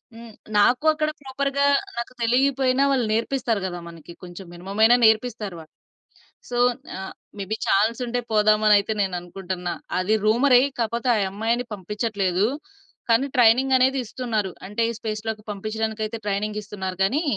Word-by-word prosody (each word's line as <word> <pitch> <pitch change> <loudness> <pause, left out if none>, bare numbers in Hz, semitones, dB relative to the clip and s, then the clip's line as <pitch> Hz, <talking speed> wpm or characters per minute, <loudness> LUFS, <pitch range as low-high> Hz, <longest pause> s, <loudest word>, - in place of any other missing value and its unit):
హ్మ్. 230 -1 -11 0.2
నాకూ 245 +8 +3
అక్కడ 305 0 -1
ప్రాపర్‌గా 275 +1 -1 0.3
నాకు 235 +2 -4
తెలీకపోయినా 260 +2 +2
వాళ్ళు 255 -4 +1
నేర్పిస్తారు 230 -2 -1
గదా! 175 -1 -6
మనకి. 165 0 -12
కొంచెం 180 +2 -9
మినిమమయినా 200 +7 +3
నేర్పిస్తారు 220 -4 +1
వాళ్ళు. 155 -1 -15 0.8
సో, 240 - -3 0.4
ఆహ్, 190 - -7 0.3
మేబి 200 +3 -3
చాన్సుంటే, 235 +4 +1
పోదామనయితే 215 0 +4
నేననుకుంటున్నా. 180 -1 -4 0.3
అది 215 +4 +2
రూమరే, 245 +3 +5 0.2
కాపోతే 235 +2 -1
ఆ - - +1
యమ్మాయిని 225 +5 -1
పంపించట్లేదు. 200 -1 -1 0.6
కానీ, 240 +5 +4
ట్రైనింగనేది 260 +3 +4
ఇస్తున్నారు. 220 -5 -2 0.2
అంటే, 210 +4 -2 0.2
స్పేస్‌లోకి 215 0 -4
పంపిచ్చడానికయితే 220 +2 -3
ట్రైనింగిస్తున్నారు 205 -2 -3
గానీ, 275 - +1
220 Hz, 120 wpm, -23 LUFS, 200-245 Hz, 0.8 s, రూమరే